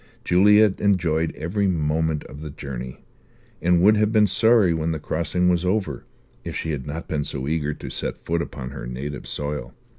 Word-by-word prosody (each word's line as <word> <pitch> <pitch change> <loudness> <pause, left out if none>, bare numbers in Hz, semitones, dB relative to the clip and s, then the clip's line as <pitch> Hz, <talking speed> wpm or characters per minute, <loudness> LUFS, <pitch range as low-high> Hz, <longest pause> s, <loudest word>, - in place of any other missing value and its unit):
Juliet 105 +3 +5
enjoyed 85 -5 +2
every 100 +6 -1
moment 80 -2 0
of 70 - -11
the 75 - -6
journey; 65 -3 -7 0.6
and 90 0 +3
would 105 +2 +6
have 105 0 +2
been 110 -2 +5
sorry 110 -2 +4
when 80 0 -1
the 80 - -4
crossing 85 +4 0
was 90 -1 +2
over 95 +2 -1 0.4
if - - -6
she 80 - -2
had 70 -2 -4
not 80 +3 -5
been 75 -2 -1
so 65 -1 -4
eager 75 -1 -1
to - - -8
set - - -4
foot 85 0 0
upon 65 -5 -6
her - - -7
native 65 +4 -6
soil. 70 -4 -4
80 Hz, 185 wpm, -23 LUFS, 75-95 Hz, 0.6 s, would